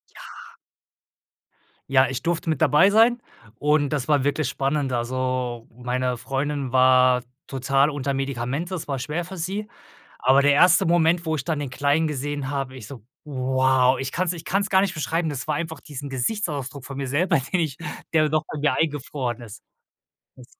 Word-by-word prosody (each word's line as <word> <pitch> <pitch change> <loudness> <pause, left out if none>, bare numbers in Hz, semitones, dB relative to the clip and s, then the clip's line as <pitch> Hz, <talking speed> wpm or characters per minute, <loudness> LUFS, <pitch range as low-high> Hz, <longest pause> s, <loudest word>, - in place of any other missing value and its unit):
Ja. - - -11 1.7
Ja, 130 0 +5
ich 130 +1 -4
durfte 170 -1 -1
mit 155 -2 -1
dabei 155 +7 +5
sein 230 +3 +4 0.4
und 145 -1 +2
das 145 -4 -2
war 145 -3 +3
wirklich 145 -1 0
spannend. 140 0 -1
Also, 125 -1 -2
meine 125 +1 -2
Freundin 135 +1 -3
war 130 -1 +5 0.2
total 135 +2 +1
unter 140 -1 -2
Medikamente, 135 +6 -3
es 175 - -5
war 140 -2 -2
schwer 150 +6 -3
für 185 +2 -9
sie. 195 +5 -3 0.5
Aber 135 +2 +4
der 145 0 +4
1. 180 +4 +5
Moment, 170 0 +2
wo 160 - +1
ich 135 - -3
dann 155 +2 -2
den 145 -3 -4
Kleinen 145 +4 +1
gesehen 145 -1 -3
habe, 135 -2 -3
ich 115 -5 -9
so: 125 -5 -10 0.2
„Wow!" 130 -2 +2
Ich 135 0 -3
kann's 180 0 0
ich 165 -1 -9
kann's 200 +2 0
gar 190 0 +5
nicht 195 -3 -1
beschreiben, 160 +2 -1
das 140 -2 -5
war 155 - 0
einfach 160 0 -4
diesen 145 -2 -8
Gesichtsausdruck 140 - -3
von 140 0 -7
mir 140 -1 -3
selber, 145 +5 +2
den 140 +8 -2
ich, 155 -5 -2 0.4
der 155 -1 +3
noch 155 +1 +1
bei - - -4
mir 150 +1 +1
eingefroren 140 -5 -2
ist. 110 -2 -11 0.7
Das 125 - -14
140 Hz, 180 wpm, -24 LUFS, 130-160 Hz, 1.7 s, Ja